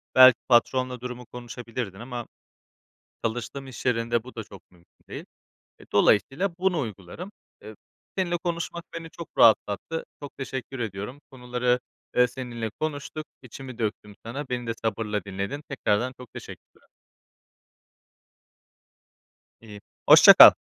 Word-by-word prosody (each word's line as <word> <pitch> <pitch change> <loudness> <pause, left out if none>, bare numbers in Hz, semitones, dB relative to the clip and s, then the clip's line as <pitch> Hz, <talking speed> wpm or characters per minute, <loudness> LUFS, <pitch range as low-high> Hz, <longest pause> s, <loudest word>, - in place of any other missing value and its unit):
belki 130 -2 +9
patronla 125 +1 +3
durumu 125 0 -6
konuşabilirdin 120 -4 -6
ama 120 -1 -6 1.0
çalıştığım 120 +4 -3
iş 130 - -9
yerinde 115 -1 +1
bu 130 - -12
da 110 - -4
çok 100 -2 -13
mümkün 85 -1 -26
değil. - - -7 0.5
Eee, - - -15
dolayısıyla 135 - +3
bunu 185 -2 +2
uygularım. 110 - -6 0.3
Eee, 110 - -10 0.4
seninle 175 -2 +1
konuşmak 170 -1 -3
beni 165 -1 -6
çok 170 +1 -9
rahatlattı. 110 +8 +3 0.2
Çok 140 - -9
teşekkür 130 -1 -5
ediyorum. 110 +5 -5
Konuları, 125 -1 0 0.4
eee, 125 0 +6
seninle 120 -2 -5
konuştuk. 155 0 -4 0.2
İçimi 130 0 -10
döktüm 105 -2 -3
sana. 135 +4 -5
Beni 120 -1 -3
de 115 - 0
sabırla 105 -1 -1
dinledin. 100 +9 -4
Tekrardan 125 -2 0
çok 125 -1 -13
teşekkürler. - - -12 2.7
İii, 105 -2 -11 0.3
hoşça - - +11
kal! - - +11
125 Hz, 125 wpm, -26 LUFS, 110-135 Hz, 2.7 s, hoşça